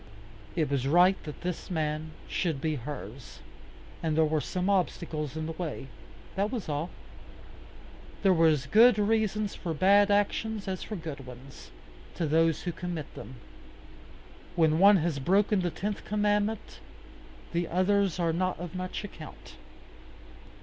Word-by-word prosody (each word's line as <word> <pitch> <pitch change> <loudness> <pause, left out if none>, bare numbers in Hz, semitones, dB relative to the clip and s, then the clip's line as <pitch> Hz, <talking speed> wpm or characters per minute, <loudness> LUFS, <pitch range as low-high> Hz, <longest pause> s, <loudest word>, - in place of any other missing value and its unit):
It 155 -5 0
was 135 -1 0
right 180 +5 +5
that 150 - -8
this 180 -1 -4
man 155 -2 -2 0.2
should 165 -6 -1
be 155 +2 -1
hers, 145 +1 -7 0.6
and 160 -2 -1
there 160 - +5
were 155 0 0
some 180 +4 -2
obstacles 160 -6 -1
in 160 - -3
the 165 - -3
way. 160 -5 -5 0.5
That 200 +2 0
was 235 -7 -4
all. 150 +3 -2 1.3
There 195 - +5
are 165 -1 +4
as 150 -4 +2
good 225 - +6
reasons 215 -1 +1
for 165 -3 -4
bad 200 +5 +5
actions 205 +1 0
as 190 -1 -3
for 215 - -5
good 155 -7 -7
ones, 130 +2 -12 0.5
to 170 - -1
those 160 +1 +2
who 175 - -2
commit 170 -3 -5
them. 130 - -9 1.2
When 160 -2 +3
one 200 +1 +8
has 165 -4 -1
broken 195 +6 +2
the 175 - 0
tenth 205 +4 -4
commandment, 210 +1 0 0.7
the 170 0 0
others 190 0 +2
are 165 -2 +1
not 185 +1 -1
of 175 -2 -6
much 185 +1 -4
account. 205 - -10
175 Hz, 150 wpm, -29 LUFS, 155-200 Hz, 1.3 s, one